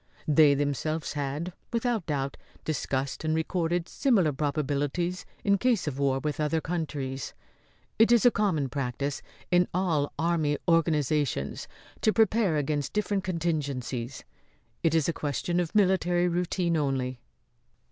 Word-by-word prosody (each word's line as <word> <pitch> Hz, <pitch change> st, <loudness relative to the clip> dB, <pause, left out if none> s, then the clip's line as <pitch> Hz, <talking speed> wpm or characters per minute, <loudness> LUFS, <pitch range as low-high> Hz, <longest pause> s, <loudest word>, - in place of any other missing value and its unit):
They 150 Hz, -1 st, +6 dB
themselves 145 Hz, +2 st, -1 dB
had, 145 Hz, +4 st, -3 dB, 0.2 s
without 230 Hz, -5 st, -1 dB
doubt, 140 Hz, -2 st, -2 dB, 0.3 s
discussed 140 Hz, -2 st, -2 dB
and 155 Hz, 0 st, +1 dB
recorded 165 Hz, +1 st, 0 dB
similar 195 Hz, -, +2 dB
probabilities 145 Hz, +5 st, -1 dB, 0.2 s
in 200 Hz, -1 st, +3 dB
case 245 Hz, -5 st, +2 dB
of 140 Hz, -3 st, -3 dB
war 135 Hz, -1 st, +2 dB
with 150 Hz, +3 st, -3 dB
other 155 Hz, +1 st, +1 dB
countries. 145 Hz, -6 st, -4 dB, 0.6 s
It 225 Hz, +1 st, +6 dB
is 240 Hz, 0 st, +5 dB
a 245 Hz, -, +8 dB
common 185 Hz, -11 st, +1 dB
practice 140 Hz, +1 st, -3 dB, 0.3 s
in 180 Hz, 0 st, +4 dB
all 165 Hz, -6 st, +1 dB
army 160 Hz, -2 st, +1 dB
organisations 150 Hz, -, +1 dB, 0.3 s
to 215 Hz, -, +4 dB
prepare 215 Hz, -6 st, +3 dB
against 145 Hz, -1 st, -1 dB
different 205 Hz, -2 st, 0 dB
contingencies. 140 Hz, -8 st, -2 dB, 0.6 s
It 165 Hz, -1 st, +2 dB
is 160 Hz, -3 st, +2 dB
a 170 Hz, -, +1 dB
question 155 Hz, +5 st, -1 dB
of 175 Hz, +3 st, -2 dB
military 180 Hz, -3 st, +3 dB
routine 175 Hz, -1 st, 0 dB
only." 130 Hz, -4 st, -1 dB
155 Hz, 130 wpm, -28 LUFS, 140-180 Hz, 0.6 s, a